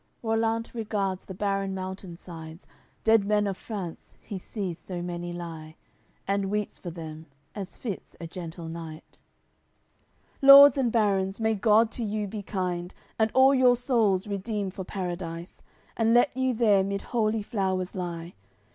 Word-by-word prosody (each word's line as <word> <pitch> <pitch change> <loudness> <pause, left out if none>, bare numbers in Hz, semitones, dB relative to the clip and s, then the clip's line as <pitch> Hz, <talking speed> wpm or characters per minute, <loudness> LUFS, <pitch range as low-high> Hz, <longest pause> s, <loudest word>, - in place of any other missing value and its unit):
AOI. 225 - -3
CXL 225 - +3
Rollant 225 0 -1
regards 205 -5 -2
the 190 - -7
barren 195 -1 -1
mountain 185 -2 -6
sides; 165 -1 -10 0.4
Dead 220 -2 +5
men 210 +1 +2
of 195 -1 -1
France, 190 -5 -7
he 200 -3 -7
sees 185 -3 -5
so 180 -1 -6
many 175 0 -4
lie, 165 -3 -7 0.5
And 195 0 0
weeps 210 0 -2
for 175 - -6
them 160 -1 -8 0.3
as 195 -3 -7
fits 210 -7 -6
a 170 - -6
gentle 165 -1 -7
knight: 160 -1 -9 1.2
"Lords 275 0 +10
and 245 -3 +2
barons, 195 -3 +1
may 220 0 +2
God 220 +2 +4
to 235 - -4
you 210 -1 -2
be 205 +1 -5
kind! 180 -3 -3 0.2
And 220 0 +3
all 265 +1 +7
your 255 -2 +5
souls 225 -6 +2
redeem 205 -1 -3
for 190 0 -6
Paradise! 175 -2 -5 0.3
And 225 0 +3
let 245 +2 +4
you 260 -1 +1
there 210 -4 +4
mid 200 0 -3
holy 220 -2 +1
flowers 190 -3 -1
lie! 175 -2 -5
195 Hz, 160 wpm, -27 LUFS, 175-220 Hz, 1.2 s, Lords